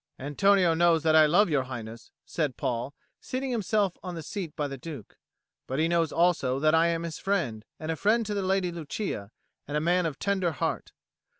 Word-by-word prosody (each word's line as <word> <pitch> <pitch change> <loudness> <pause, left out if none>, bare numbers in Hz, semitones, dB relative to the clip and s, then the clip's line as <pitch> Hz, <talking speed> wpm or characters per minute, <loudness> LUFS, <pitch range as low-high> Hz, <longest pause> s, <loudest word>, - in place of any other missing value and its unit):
"Antonio 180 +5 +3
knows 165 -1 +3
that 160 -1 +4
I 155 -1 +7
love 180 +7 +4
Your 145 -5 +1
Highness," 115 -3 -8 0.2
said 150 -6 -2
Paul, 125 +3 -2 0.2
seating 260 +1 -4
himself 210 -4 +1
on 180 -1 -6
the 165 - -6
seat 185 -5 -5
by 150 -3 -1
the 140 - -6
Duke, 135 -5 -9 0.5
"but 130 - -3
he 160 +2 +2
knows 165 -2 +1
also 165 -7 +2
that 155 +2 +3
I 165 +1 +5
am 170 0 -1
his 165 -2 -5
friend, 155 - -1 0.2
and 160 +1 -3
a - - -1
friend 220 +6 +2
to 210 - -3
the 200 - -1
Lady 190 -1 0
Lucia, 155 - -4 0.4
and 145 +1 -1
a - - +2
man 175 +2 +2
of 155 - -5
tender 190 -4 0
heart. 140 - -3
165 Hz, 205 wpm, -28 LUFS, 145-185 Hz, 0.5 s, I